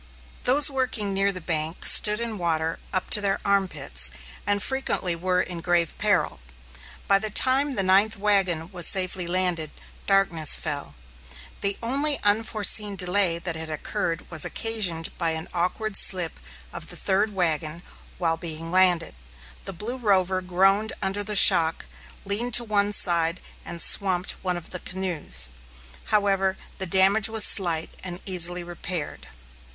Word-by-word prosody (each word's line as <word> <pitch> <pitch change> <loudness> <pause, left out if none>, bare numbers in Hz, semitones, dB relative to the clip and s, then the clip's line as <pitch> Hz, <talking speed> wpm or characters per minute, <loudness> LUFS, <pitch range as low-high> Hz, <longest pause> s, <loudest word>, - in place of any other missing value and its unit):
Those 285 +3 +3
working 245 -7 -2
near 195 +1 +1
the 185 - -6
bank 160 0 -3
stood 210 0 +7
in 230 -3 -5
water 165 -1 -2
up 185 - -3
to 210 - +5
their 195 -1 -1
arm 200 -1 +2
pits, - - -2 0.4
and 205 0 +1
frequently 200 -8 -1
were 180 +2 -1
in 175 -2 -6
grave 170 -1 0
peril. - - 0 0.7
By 195 0 +3
the 215 +1 -3
time 270 +6 +2
the 195 - 0
ninth 195 +4 +2
wagon 190 -5 0
was 175 -3 +2
safely 185 -2 +1
landed, 175 -3 -1 0.4
darkness 180 -6 +1
fell. 140 - -5 0.6
The 200 0 -2
only 280 +4 -1
unforeseen 210 -1 +2
delay 180 -1 +1
that 170 -1 -5
had 160 0 -4
occurred 155 +2 -4
was 160 -3 -1
occasioned 195 -8 -1
by 165 -2 -1
an 160 - -8
awkward 195 +5 -3
slip 180 -4 +3 0.3
of - - -9
the - - -8
third 200 +2 -1
wagon 165 -2 -1 0.3
while 165 -2 -1
being 165 0 -7
landed. 180 -2 +2 0.5
The 195 - -6
Blue 215 +8 -5
Rover 190 -5 +1
groaned 195 +4 +1
under 195 +2 -2
the 210 +1 -3
shock, 165 -4 +5 0.4
leaned 220 +4 +1
to 240 - +2
one 205 -2 0
side 170 -3 +1 0.2
and 170 - -8
swamped 185 +1 +3
one 180 -2 -2
of 170 - -10
the 180 - -6
canoes. 165 - -3 0.5
However, 195 -2 0 0.2
the 190 - -2
damage 195 +4 +3
was 220 -1 +5
slight 170 -5 +4
and 180 -1 -6
easily 180 -1 +3
repaired. 175 -2 -6
185 Hz, 150 wpm, -24 LUFS, 170-205 Hz, 0.7 s, stood